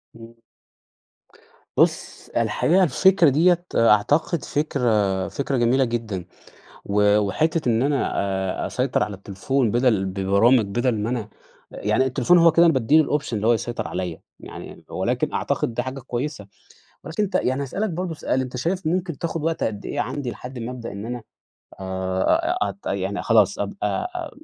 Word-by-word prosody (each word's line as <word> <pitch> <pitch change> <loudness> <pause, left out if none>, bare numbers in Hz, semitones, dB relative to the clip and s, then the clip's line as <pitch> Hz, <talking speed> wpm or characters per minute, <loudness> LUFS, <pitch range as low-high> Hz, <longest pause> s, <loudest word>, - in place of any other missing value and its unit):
إمم. 115 0 -13 1.4
بُص، - - 0
الحقيقة 135 - +2
الفكرة 180 +1 +4
ديّة 175 +5 +3
أعتقد 130 - +3
فكرة 110 -10 0
فكرة 140 -1 -2
جميلة 125 +3 +3
جدًا. 110 -6 -4 0.6
و 105 +1 +3
وحتّة 150 - 0
إن 115 0 +2
أنا 140 0 +1 0.5
أ - - -1
أسيطر 130 0 0
على 105 - -2
التليفون 100 +6 -1
بَدَل 120 -5 +2
ببرامج 100 +6 +3
بَدَل 120 +5 0
ما 110 +3 -2
أنا 115 -4 -3 0.4
يعني 105 +5 0
التليفون 175 +7 +3
هو 165 -1 +6
كده 170 +2 +5
أنا 165 - +5
بادّي 130 +5 +3
له - - +6
الأوبشن 140 -6 -2
اللي 105 +2 -2
هو 120 - +5
يسيطر 120 +1 -3
عليّا. 90 -2 -4 0.2
يعني - - -10
ولكن - - -1
أعتقد 115 - -1
ده 125 - -1
حاجة 130 +1 -6
كويسة. 125 -3 -4 0.6
ولكن 170 +6 -2
أنت 200 - -3
يعني 130 +2 +1
هاسألك 195 +10 -2
برضه 175 0 -3
سؤال، 130 -3 -1
أنت 130 -1 -5
شايف 170 +7 -2
ممكن 170 -3 -1
تاخُد 165 -2 -3
وقت 165 0 -1
قد 105 -2 -4
إيه - - -3
عندي 130 +1 -3
لحد 125 +3 -8
ما 115 +2 -5
أبدأ 120 -2 -7
إن 100 +2 -6
أنا 120 -1 -5 0.6
آآ 95 - 0
أ - - +1
أت - - -7
يعني - - -2
خلاص - - +3
أبقى 365 - -2
أ 340 -3 -4
125 Hz, 165 wpm, -23 LUFS, 105-155 Hz, 1.4 s, هو